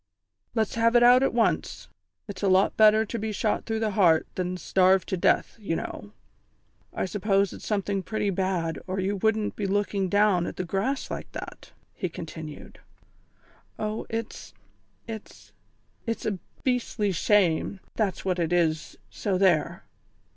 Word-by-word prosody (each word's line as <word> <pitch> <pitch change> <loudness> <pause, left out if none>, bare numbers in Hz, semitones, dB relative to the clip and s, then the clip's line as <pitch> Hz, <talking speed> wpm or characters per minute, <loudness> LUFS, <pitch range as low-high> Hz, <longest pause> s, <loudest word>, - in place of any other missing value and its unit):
"Let's 220 -2 0
have 230 +1 +2
it 240 - +6
out 245 +1 +7
at 270 - +2
once. 235 -1 0 0.4
It's 200 -3 -7
a 200 - +1
lot 190 +1 +3
better 215 0 +6
to 230 +2 -4
be 220 +1 -3
shot 210 +1 -1
through 225 -1 -1
the 220 -1 0
heart 175 -5 +4
than 180 0 -3
starved 185 0 +3
to - - 0
death, 175 - +1
you 195 -6 -2
know. 100 -9 -6 0.8
I - - -2
suppose 195 0 +1
it's - - -9
something 200 -2 -1
pretty 205 +1 -1
bad, 180 -3 -1
or 190 +1 -2
you 195 +2 -1
wouldn't 220 +1 0
be 205 - -2
looking 200 -1 0
down 200 -3 +3
at - - -6
the - - -3
grass 200 +10 -2
like - - -6
that," - - -8 0.2
he 185 - -3
continued. 160 -2 -9 1.0
"Oh, 215 +1 -3
it's 225 -1 -6 0.5
it's 220 -2 -9 0.6
it's 230 - -3
a 200 -4 -1 0.2
beastly 240 -5 0
shame, 190 0 +2
that's 200 -5 -2
what 185 -1 0
it 170 -1 0
is, 160 -3 0
so 185 - -1
there!" 175 -6 +2
200 Hz, 160 wpm, -26 LUFS, 185-220 Hz, 1.0 s, out